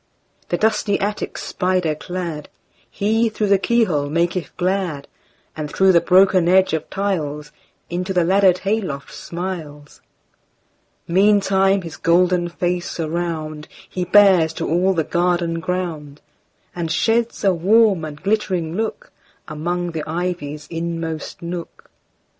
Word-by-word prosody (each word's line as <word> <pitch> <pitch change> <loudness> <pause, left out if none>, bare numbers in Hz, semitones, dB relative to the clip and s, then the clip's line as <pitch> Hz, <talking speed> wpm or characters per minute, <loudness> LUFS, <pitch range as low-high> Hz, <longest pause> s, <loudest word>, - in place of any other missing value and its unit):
The - - 0
dusty 215 -2 +1
attic 205 +1 -3
spider 180 -4 -1
cladHe, 185 +7 -3
through 215 0 -1
the 200 -1 +4
keyhole, 185 -11 +1
maketh 170 +3 0
glad; 180 -6 -1 0.5
And 150 -1 -5
through 190 0 +4
the 170 -2 +5
broken 185 -1 +4
edge 190 -1 +4
of 160 -1 -2
tiles, 155 -7 -3 0.4
Into 180 +2 -3
the 180 -2 +2
laddered 190 +1 +4
hay 215 +3 +1
loft 140 -8 -6
smiles. 165 -5 -7 1.1
Meantime 195 0 +3
his 165 -2 -8
golden 175 +1 +2
face 175 0 -2
aroundHe 165 +1 -4
bears 190 -6 +6
to 165 0 -4
all 185 +4 +2
the 160 - +1
garden 170 0 0
ground, 165 -5 -4 0.6
And 170 -2 -3
sheds 225 +7 0
a 195 -2 +4
warm 195 +1 +3
and 150 -1 -7
glittering 190 -5 -1
lookAmong 175 -5 -5
the 160 - -3
ivy's 160 -4 -3
inmost 165 -1 -4
nook. 170 0 -7
175 Hz, 120 wpm, -20 LUFS, 160-190 Hz, 1.1 s, bears